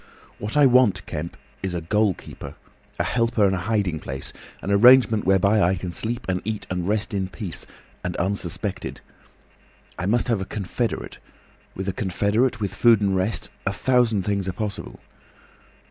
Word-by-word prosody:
"What 105 +7 -3
I 145 - +7
want, 125 -8 +4
Kemp, 80 +2 -5 0.2
is 95 -2 -3
a 85 - -2
goal 105 +3 +1
keeper, - - -10 0.4
a - - +1
helper, 115 -3 +1
and 95 - +2
a 95 - -1
hiding 95 -4 -1
place, 65 -1 -6 0.3
an 100 - -2
arrangement 115 +1 +6
whereby 100 +3 +4
I 90 +1 +3
can 90 0 -5
sleep 115 +6 -3
and 90 -1 -1
eat 110 0 -3
and 90 -1 -2
rest 105 0 0
in 95 -2 -1
peace, 95 -2 -4 0.4
and - - -3
unsuspected. 95 +1 -3 1.0
I 90 - -2
must 120 +3 +2
have 115 -5 +1
a - - -3
confederate. 110 +4 -3 0.6
With 95 +1 -5
a 95 - -1
confederate, 105 +6 0
with 100 -2 -2
food 115 -3 +5
and 100 -2 +1
rest—a 95 0 -2
thousand 120 -4 +2
things 100 -2 -1
are - - -3
possible. 105 -2 -5
100 Hz, 165 wpm, -23 LUFS, 95-110 Hz, 1.0 s, I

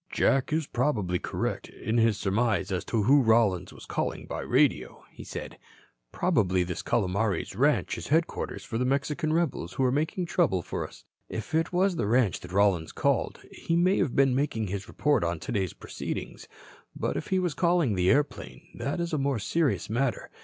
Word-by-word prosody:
"Jack 135 +1 +2
is 155 0 +1
probably 110 -10 0
correct - - -3
in 115 +2 -2
his 115 -2 +3
surmise 105 -1 0
as 90 -2 -1
to 110 -3 0
who 140 +6 +5
Rollins 110 -6 +3
was - - -12
calling - - -3
by - - -5
radio," - - +1
he - - -11
said. - - -7 0.5
"Probably 95 -3 +2
this 90 -1 -4
Calomares 100 -3 0
ranch 145 +7 +1
is - - -7
headquarters 160 +2 -1
for 115 - -4
the - - +1
Mexican 140 +4 0
rebels 155 - -1
who 135 - 0
are 125 - +3
making 155 +6 -1
trouble 145 - +1
for - - -4
us. - - -17 0.2
If 110 +7 -6
it 165 +1 +1
was 185 0 +2
the 100 - 0
ranch 115 -3 +2
that 90 - -11
Rollins 95 -4 +2
called, - - 0
he 165 - -2
may 180 +3 +3
have 130 - 0
been 135 -2 +4
making 125 -6 -1
his 100 +1 -4
report 145 -10 +1
on 85 -1 -1
today's 95 -1 -2
proceedings. - - -6 0.5
But - - -2
if - - -4
he 190 - +1
was 180 -4 0
calling 170 - +2
the 90 -1 +2
airplane, 135 - -1
that 140 +5 -3
is 170 -1 -2
a 155 - +1
more 135 -2 0
serious 155 +7 0
matter. 120 +4 -1
120 Hz, 190 wpm, -28 LUFS, 100-150 Hz, 0.5 s, who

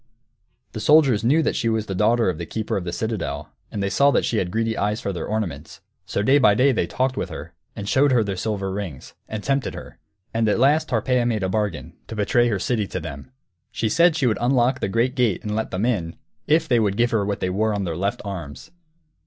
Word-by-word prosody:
The - - -6
soldiers 140 -8 +4
knew 150 +7 +3
she 115 - 0
was 110 -1 0
the 95 - -4
daughter 115 +5 +2
of 90 -3 -1
the 85 - -4
keeper 110 -1 -3
of 95 - -2
the 85 - -3
citadel, 90 -9 -3 0.2
and 100 - -3
they 100 - 0
saw 140 0 +4
that - - +2
she 115 - -1
had 90 - -1
greedy 115 +3 -1
eyes 105 +2 -1
for 100 - -3
their 85 - -4
ornaments. 85 -9 -4 0.3
So 100 - -1
day 135 +6 +5
by 105 -6 +5
day 135 +5 +4
they 110 -8 0
talked 130 +7 -1
with - - -2
her, 80 +1 -8 0.2
and 100 -2 -6
showed 140 +5 +3
her 120 -3 +4
their 100 -2 -3
silver 100 0 -2
rings, 95 -9 -6 0.2
and 110 -1 -5
tempted 135 -2 -1
her. 60 - -10 0.3
And 115 -1 +1
at - - +2
last 145 +6 +3
Tarpeia 125 +1 +1
made 110 -4 -1
a 95 - 0
bargain, 95 - -2
to 110 - -7
betray 115 +3 +2
her 105 -4 0
city 105 +1 -1
to 95 - -4
them. 70 - -8 0.4
She 110 - -1
said 170 +6 +4
she 145 - 0
would 115 -3 +1
unlock 125 +1 +2
the - - -2
great 115 +5 +1
gate 120 -8 0
and 105 0 -3
let 110 - -2
them 95 +4 -1
in, 90 -10 -1 0.3
_if 160 +1 +3
they 120 -3 +3
would 100 -2 0
give 120 +1 +2
her 110 -3 +1
what 100 0 -2
they 90 - -1
wore 110 +4 +1
on 100 -1 -1
their 85 -3 -3
left 100 +4 -2
arms. 85 -9 -7
110 Hz, 245 wpm, -23 LUFS, 95-120 Hz, 0.4 s, day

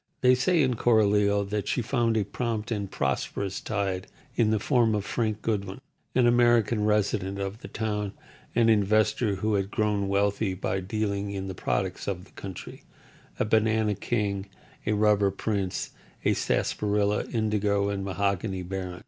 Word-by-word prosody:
They 125 0 +6
say, 155 +6 +3
in 125 -3 +1
Coralio, 105 -3 +3
that 105 -1 -1
she 125 - 0
found 115 -2 +1
a 105 - +2
prompt 110 +2 -3
and 100 -3 -2
prosperous 80 +8 -2
tide 100 -4 -2 0.3
in 115 -2 +3
the 110 - +2
form 115 0 +2
of 100 -1 -2
Frank 110 -3 -2
Goodwin, 100 -2 -2 0.4
an 125 -1 +4
American 120 -3 +4
resident 105 -2 +1
of 100 +2 -4
the - - -9
town, 105 -2 -3 0.4
an 115 -1 +4
investor 110 0 +3
who 110 +3 -1
had 100 -1 0
grown 105 -2 0
wealthy 100 0 +1
by 95 +1 -2
dealing 100 +1 -2
in 95 -1 -4
the 95 - -4
products 95 +1 -2
of 95 -2 -3
the - - -22
country—a 95 +2 -8
banana 110 0 +2
king, 100 -2 -2 0.4
a 105 - +3
rubber 105 -1 +3
prince, 100 -1 -2 0.3
a - - +4
sarsaparilla, 105 0 0
indigo, 105 -3 +1
and 100 -1 -2
mahogany 100 0 -1
baron. 90 -1 -5
105 Hz, 155 wpm, -27 LUFS, 100-110 Hz, 0.4 s, They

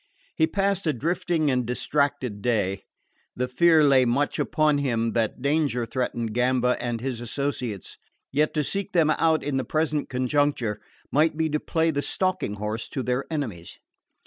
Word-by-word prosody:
He 160 - +3
passed 195 -1 0
a 155 - +2
drifting 160 +2 0
and 125 -1 +1
distracted 125 -2 -1
day. 100 -5 0 0.5
The 125 +1 -1
fear 160 +4 +4
lay 135 -3 +5
much 125 +4 0
upon 155 -2 +2
him 115 -5 0
that 115 +2 -1
danger 140 -5 +1
threatened 115 -2 -2
Gamba 125 +1 +2
and 120 -1 -2
his 125 -1 -4
associates; 120 - -3 0.3
yet 150 +2 +2
to 150 - +2
seek 200 +6 -3
them 160 -3 +4
out 160 0 +2
in 140 -2 -1
the 130 - 0
present 155 0 -1
conjuncture 125 -4 0 0.3
might 155 +2 +2
be 160 0 +1
to 150 0 0
play 165 +1 0
the 145 -2 -1
stalking 185 - -1
horse 105 +2 -4
to 135 - -3
their 125 +2 -1
enemies. 115 - -4
135 Hz, 165 wpm, -25 LUFS, 120-155 Hz, 0.5 s, lay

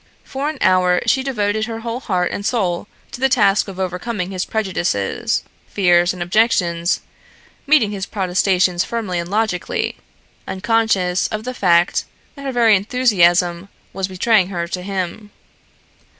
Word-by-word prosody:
For 275 +2 -3
an 310 - -6
hour 180 -1 +3
she 265 - +2
devoted 215 -5 -1
her 225 -1 -5
whole 235 +1 -4
heart 180 -8 -1
and 200 - -4
soul 200 -5 -1 0.2
to 245 - -8
the 265 - +3
task 210 -6 +3
of 190 -1 -8
overcoming 185 +1 -3
his 185 -1 -2
prejudices, 175 - -1 0.2
fears 175 -3 +3
and 180 -1 -4
objections, 175 -3 +1 0.7
meeting 275 -8 +4
his 195 -2 -4
protestations 185 -2 +1
firmly 210 -7 -3
and 170 0 -5
logically, 210 -3 -1 0.5
unconscious 190 -3 +1
of 215 0 -5
the 255 +2 -4
fact 175 -6 +2 0.3
that 280 -1 -10
her 270 - -1
very 230 -4 +4
enthusiasm 185 -5 +2 0.2
was 195 -1 -2
betraying 190 +1 +2
her 170 -3 -3
to 180 - -4
him. 195 +2 -4
195 Hz, 145 wpm, -19 LUFS, 180-225 Hz, 0.7 s, meeting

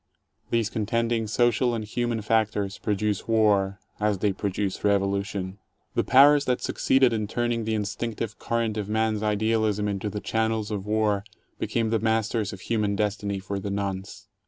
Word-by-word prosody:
These 115 -2 +1
contending 115 +1 0
social 120 +2 +2
and 110 -2 -3
human 120 0 -2
factors 105 -2 0
produce 105 -1 -1
war, 105 -3 +2 0.2
as 105 -1 +1
they 100 +1 +1
produce 100 0 -2
revolution. 100 -1 0
f^ - - -16 0.4
The - - +1
powers 140 +2 +6
that 125 -1 +1
succeeded 130 -2 +2
in 110 -2 -1
turning 120 0 -1
the 110 0 0
instinctive 105 +1 -3
current 115 -2 -1
of 105 -1 -3
man's 110 -1 +1
idealism 105 -1 +1
into 100 +1 -2
the 105 - -4
channels 110 0 -1
of 100 -1 -4
war, 105 -2 +1 0.4
became 115 -1 0
the 115 - +2
masters 110 -1 0
of 95 - -9
human 105 -2 0
destiny 100 -1 -1
for 95 +1 -4
the 100 - -4
nonce. 100 -1 -4
105 Hz, 160 wpm, -26 LUFS, 100-115 Hz, 0.4 s, powers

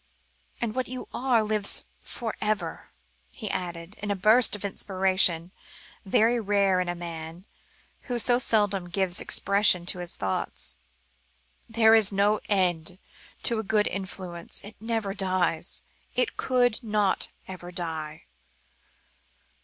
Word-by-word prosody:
And 230 -3 -2
what 255 +1 -2
you 255 0 -6
are 245 -3 +2
lives 215 -1 +4 0.2
for 225 -2 -6
ever," 210 -6 -2 0.4
he - - -6
added, 175 +1 -5
in 205 - -4
a 200 - +1
burst 215 +5 +5
of 205 -1 -6
inspiration 185 -3 +1 0.5
very 225 +5 +3
rare 200 -3 +2
in 180 - -1
the 175 - -2
man, 170 +1 -7 0.6
who 245 - -1
so 240 +1 +5
seldom 205 -6 +1
gave 185 0 +1
expression 200 -3 +3
to 180 - +1
his 175 -1 -5
thoughts. 95 -1 -3 1.0
"There 225 0 +5
is 220 -3 +5
no 205 +2 +2
end 180 -3 0 0.5
to 235 -3 +2
a - - -3
good 210 0 +1
influence; 185 -3 -4
it 210 +2 -9
never 225 -3 -2
dies; 185 -3 -1 0.3
it 250 - 0
could 245 -3 +1
not 210 -3 0 0.2
ever 180 -1 -8
die. 160 -4 -5
195 Hz, 130 wpm, -26 LUFS, 175-220 Hz, 1.0 s, burst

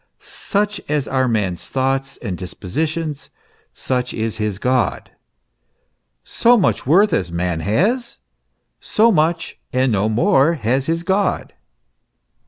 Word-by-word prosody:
Such 205 -1 -2
as 150 -2 0
are 130 -1 +1
a - - 0
man's 100 -6 -1
thoughts 135 0 -1
and 100 -6 -3
disposi 90 - -3
tions, 155 -2 -5 0.5
such 125 -1 -2
is 110 -1 -2
his 105 -3 -2
God; 125 -1 0 1.1
so 240 +1 +3
much 185 - 0
worth 195 +8 +4
as 90 - 0
a - - -11
man 85 -1 -1
has, 215 - 0 0.6
so 225 +2 +3
much 165 -1 0
and 130 0 +1
no 105 0 +1
more 165 - +3
has 130 +1 -1
his 165 +1 -1
God. 195 +2 0
135 Hz, 135 wpm, -19 LUFS, 110-170 Hz, 1.1 s, worth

